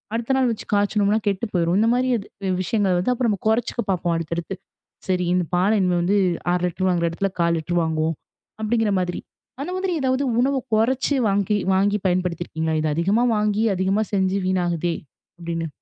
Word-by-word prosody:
அடுத்த 235 +3 -1
நாள் 255 -2 +3
வச்சு 225 - -6
காய்ச்சுணோம்னா 205 +1 +2
கெட்டுப் 200 +3 -3
போயிரும். 175 0 +2
இந்த 225 - +3
மாரி 255 +1 +1
அது 205 - -8 0.2
வ் - - +1
விஷயங்கள 185 -3 +1
அப்புறம் 230 -5 0
குறைச்சுக்க 230 +1 +1
பாப்போம், 175 -2 0
அடுத்தடுத்து. 170 +3 -4 0.5
சரி, 180 -1 +1
இந்தப் 180 -3 -1
பால 190 +4 +3
இனிமே 180 -1 +2
வந்து, 200 +4 +2 0.4
1/2 180 0 0
லிட்டர் 185 +2 -2
வாங்குற 170 -2 +1
இடத்துல 195 +3 -2
1/4 170 0 +2
லிட்டர் 175 +2 -1
வாங்குவோம். 160 0 0 0.5
அப்பிடிங்கிற 220 -1 +1
மாதிரி. 180 -1 -3 0.4
அந்த 330 - -4
மாதிரி 370 -1 -1
ஏதாவது 260 +1 +1 0.2
உணவ 270 +3 +2 0.2
கொறச்சு 260 +6 +1
வாங்கி 200 +1 +1 0.2
வாங்கி 200 +2 +2
பயன்படுத்தி 180 -1 0
இருக்கீங்களா? 160 -1 -2
இது 155 - 0
அதிகமா 195 +8 +2
வாங்கி, 210 0 +1
அதிகமா 190 +3 +1
செஞ்சு 190 0 +1
வீணாகுதே! 175 -2 0 0.4
அப்பிடீன்னு. 165 -1 -4
190 Hz, 170 wpm, -22 LUFS, 175-220 Hz, 0.5 s, நாள்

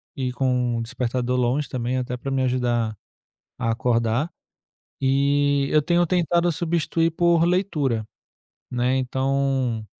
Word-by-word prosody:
e 130 -2 -2
com 125 -2 0
despertador 125 +1 -2
longe 125 +4 0
também 125 0 -2
até 125 0 -4
para 135 +2 -5
me 135 0 +1
ajudar 120 -4 0 0.6
a 125 -2 -2
acordar 115 +5 0 0.7
e 140 +1 +2
eu 150 - +4
tenho 175 +3 +2
tentado 175 0 +2
substituir 165 0 0
por 170 0 +3
leitura, 155 - 0 0.6
né, 125 +1 0
então, 130 -3 0
130 Hz, 120 wpm, -23 LUFS, 125-150 Hz, 0.7 s, eu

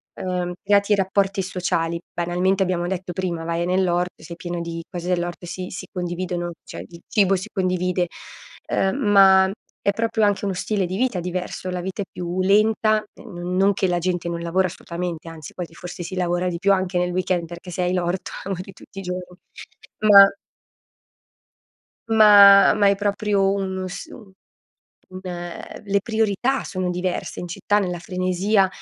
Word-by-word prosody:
ehm, 180 -1 -3
creati 200 +1 +3
rapporti 195 0 +1
sociali. 170 -2 -1
Banalmente 180 +3 +1
abbiamo 175 -2 -1
detto 185 -1 -4
prima 175 -2 -3
vai 170 +1 -1
nell'orto, 180 -1 0
sei 170 +1 -8
pieno 175 0 -4
di 170 0 -5
cose 175 -1 -5
dell'orto 175 0 -2
e - - -9
si 180 +1 -5
si 185 - -6
condividono, 175 -1 -3
cioè - - -8
il 170 -1 -14
cibo 195 -3 +3
si 190 - -5
condivide, 180 -2 0 0.6
ehm, 190 +3 +1
ma 195 -4 +6 0.3
è 200 - +2
proprio 225 +1 0
anche 205 0 +1
uno 195 - -1
stile 200 +1 -1
di 180 +1 -4
vita 245 -7 0
diverso, 180 +1 -4
la 180 -1 -3
vita 190 +3 -4
è - - -12
più 180 +1 -3
lenta, 215 +2 +3
non-non 180 +3 0
che 190 - 0
la 175 -1 +1
gente 175 -1 -2
non 170 - -3
lavora 180 +3 +1
assolutamente, 170 -1 -6
anzi 160 -3 -10
quasi 175 -2 -7
forse 175 +1 -7
si 185 +2 -6
lavora 175 0 0
di 170 -1 -4
più, 200 +2 +3
anche 185 -1 -1
nel 180 0 0
weekend, 180 -2 0
perché 175 +1 -9
se 180 - -3
hai 180 0 0
l'orto 180 +1 -2
lavori 190 0 -5
tutti 195 - -12
i - - -5
giorni. 180 0 -6 0.7
Ma 200 -1 +9 1.8
Ma, 205 -3 +8
ma 205 - +3
è 200 - +3
proprio 200 -1 +1
un 190 -1 -3
s 185 +2 -7
un 210 -5 -13 0.9
le 185 +2 -4
priorità 225 +4 0
sono 185 -2 -2
diverse 180 +1 -3
in 175 - -4
città, 205 +4 0
nella 180 -3 -2
frenesia, 185 +3 +1
185 Hz, 165 wpm, -22 LUFS, 175-195 Hz, 1.8 s, Ma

